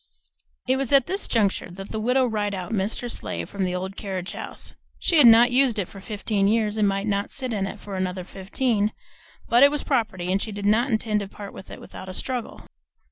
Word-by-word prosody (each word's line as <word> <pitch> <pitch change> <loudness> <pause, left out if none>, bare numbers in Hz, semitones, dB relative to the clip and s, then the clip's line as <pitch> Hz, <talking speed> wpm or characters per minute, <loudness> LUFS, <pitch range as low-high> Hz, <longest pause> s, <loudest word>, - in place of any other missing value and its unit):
It 260 - +3
was 270 -3 -1
at 275 -3 +6
this 390 +2 -3
juncture 205 -6 +1
that 195 +3 -9
the 220 - -3
Widow 250 +4 +2
Rideout 205 -5 -2
missed 205 0 -1
her 245 - -4
sleigh 235 - -3
from 200 -2 -3
the 180 0 -2
old 190 +1 -4
carriage 190 -3 -4
house. - - -7 0.2
She 330 - +2
had 265 - +9
not 235 +2 +7
used 255 -3 +3
it 195 -4 -1
for 195 - -12
fifteen 205 -1 -1
years 215 0 +1
and 210 - +4
might 195 +1 0
not 200 -1 -1
sit 255 -3 -3
in 195 -2 -1
it 205 - -7
for 200 -1 -7
another 185 0 -2
fifteen, 210 +3 -1 0.5
but 240 +1 +4
it 280 - +9
was 295 0 -2
property, 210 -9 -1
and 195 +1 +1
she 220 - -3
did 205 0 -5
not 225 +6 +3
intend 220 -2 +1
to 200 - -5
part 200 0 -9
with 190 - -11
it - - -9
without 190 - -10
a 185 - -6
struggle. 250 -3 -4
210 Hz, 230 wpm, -24 LUFS, 195-240 Hz, 0.5 s, had